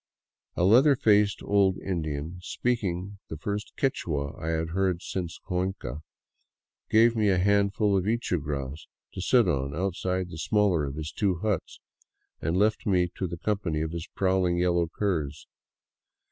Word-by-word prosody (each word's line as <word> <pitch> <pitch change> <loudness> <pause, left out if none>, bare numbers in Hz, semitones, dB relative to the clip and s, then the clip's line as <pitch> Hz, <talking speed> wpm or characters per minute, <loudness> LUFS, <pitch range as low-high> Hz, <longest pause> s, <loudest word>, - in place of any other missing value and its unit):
A - - 0
leather 130 +9 +6
faced 105 -5 +3
old 100 -2 +3
In 90 -4 -2
dian, 75 +3 -4
speaking 100 -3 -2
the 80 - -6
first 100 +7 -4
Quichua 75 - -1
I 80 - -5
had 80 0 -1
heard 90 0 0
since 90 -3 -4
Cuenca, 90 -7 -3 0.9
gave 115 +2 +5
me 105 -2 +2
a 95 - +3
handful 100 +2 +2
of 95 -1 +1
ichu 110 -6 0
grass 70 0 -5 0.3
to - - -5
sit 120 +2 +4
on 70 -4 -1
outside 90 0 -1
the 80 - -7
smaller 95 -5 +2
of 70 0 -5
his 75 0 -5
two 100 -3 0
huts, 105 -6 -2 0.6
and 80 +3 0
left 105 +2 +1
me 90 -3 +2
to 95 - -2
the 85 0 -6
company 90 -4 -1
of 80 0 -2
his 85 +1 -5
prowling 95 -2 +2
yellow 85 -1 +2
curs. 80 -6 -2
90 Hz, 160 wpm, -27 LUFS, 80-100 Hz, 0.9 s, leather